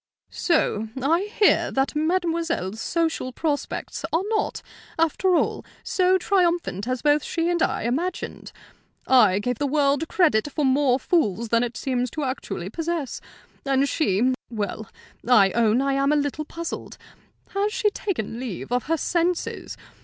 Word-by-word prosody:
"So 225 - +1
I 335 +10 +1
hear 415 - +4
that 270 0 0
mademoiselle's 330 - -1
social 325 -6 -1
prospects 290 +2 -3
are 330 +4 +1
not, 435 -1 -1 0.3
after 330 +3 +2
all, - - 0 0.2
so 370 0 +3
triumphant 345 - 0
as 255 -1 -2
both 295 0 +3
she 335 +1 -1
and 345 -2 0
I - - 0
imagined. 315 +11 -3 0.5
I 220 -8 +5
gave 240 +3 -2
the 285 - 0
world 285 +1 +1
credit 295 -8 +2
for 295 +1 0
more 265 -1 +3
fools 235 - 0
than 230 0 +3
it 240 0 -3
seems 250 -2 -1
actually 260 - -3
to 190 - -6
possess; 325 -2 -3 0.4
and 275 0 +2
she 255 - +1 0.2
well, 215 -1 -4 0.4
I 200 -6 +6
own 230 +3 +2
I 275 0 +1
am 275 +1 +2
a - - +3
little 290 +1 -1
puzzled. 335 +2 -6 0.5
Has 400 +2 0
she 425 -2 +1
taken 240 - -3
leave 240 -4 -6
of 245 0 0
her 325 +2 +1
senses? 345 +3 -1
285 Hz, 150 wpm, -24 LUFS, 245-335 Hz, 0.5 s, I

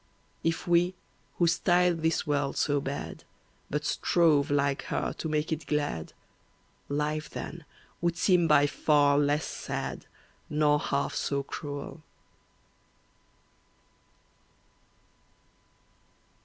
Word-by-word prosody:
If 165 +1 -1
we, 175 +1 +3 0.4
who 175 - +3
style 175 +1 +3
this 160 0 0
world 145 -2 0
so 145 -1 +1
bad, 140 +1 -5 0.5
But 150 +1 -2
strove, 155 -4 +3
like 140 -1 +1
her, - - -2
to 160 - -5
make 150 +1 -1
it 160 +1 -6
glad, 145 - -2 0.8
Life 150 +1 -1
then 170 -3 -7 0.4
would 170 0 0
seem 180 -2 +3
by 145 -2 +5
far 145 -1 +3
less 145 +1 +1
sad, - - -5 0.4
Nor 150 0 +3
half 140 - -1
so 140 -1 -1
cruel. 145 +2 -6
150 Hz, 100 wpm, -28 LUFS, 145-165 Hz, 0.8 s, by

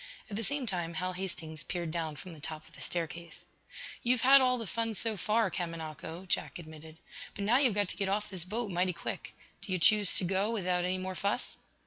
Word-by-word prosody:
At - - -3
the 220 - -1
same 280 +3 0
time 175 -5 -2
Hal 185 +2 -1
Hastings 165 -4 -2
peered 170 -1 -3
down 160 -2 -2
from 175 +4 -9
the 155 - -11
top 155 +1 -5
of 165 - -20
the - - -12
staircase. 170 -1 -4 0.6
"You've 245 0 +2
had 270 +1 +9
all 250 -1 +4
the 230 - -3
fun 225 +2 -1
so 225 +1 -1
far, 210 +1 +2
Kamanako," 165 0 -5
Jack - - -1
admitted. 160 -1 -11 0.4
"But 200 - -3
now 235 +4 +5
you've 260 -7 +3
got 205 -2 +2
to - - -4
get 195 -1 0
off 210 +2 0
this 185 -4 -4
boat 210 +3 -2
mighty 180 +1 +1
quick. - - -5 0.3
Do 200 - -6
you 185 - +2
choose 205 +3 +6
to - - +5
go 190 +3 +1
without 180 -5 +1
any 185 +1 +1
more 185 0 -3
fuss?" 200 +2 -1
185 Hz, 220 wpm, -32 LUFS, 170-210 Hz, 0.6 s, had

